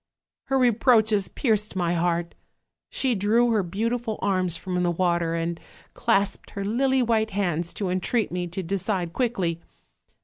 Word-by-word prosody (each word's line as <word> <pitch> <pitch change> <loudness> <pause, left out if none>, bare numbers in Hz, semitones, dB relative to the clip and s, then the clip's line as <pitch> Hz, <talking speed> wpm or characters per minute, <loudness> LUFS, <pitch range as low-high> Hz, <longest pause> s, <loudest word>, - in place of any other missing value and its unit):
"Her 270 - +1
reproaches 225 -4 +3
pierced 215 -5 0
my 175 -2 0
heart; 170 0 0 0.6
she 260 -2 0
drew 225 +4 +2
her 215 -2 +3
beau 195 +6 -2
tiful 235 -2 -3
arms 185 -4 0
from 180 -1 -2
the 175 - +2
water, 170 -1 +1
and 165 0 -2 0.3
clasped 200 +1 0
her 200 0 -5
lily 260 +4 +2
white 220 -2 +1
hands 175 -4 -1
to 195 -3 -2
entreat 185 +3 0
me 180 0 -2
to 180 +3 -5
decide 185 -1 -2
quickly. 190 -10 -1
195 Hz, 150 wpm, -25 LUFS, 175-225 Hz, 0.6 s, reproaches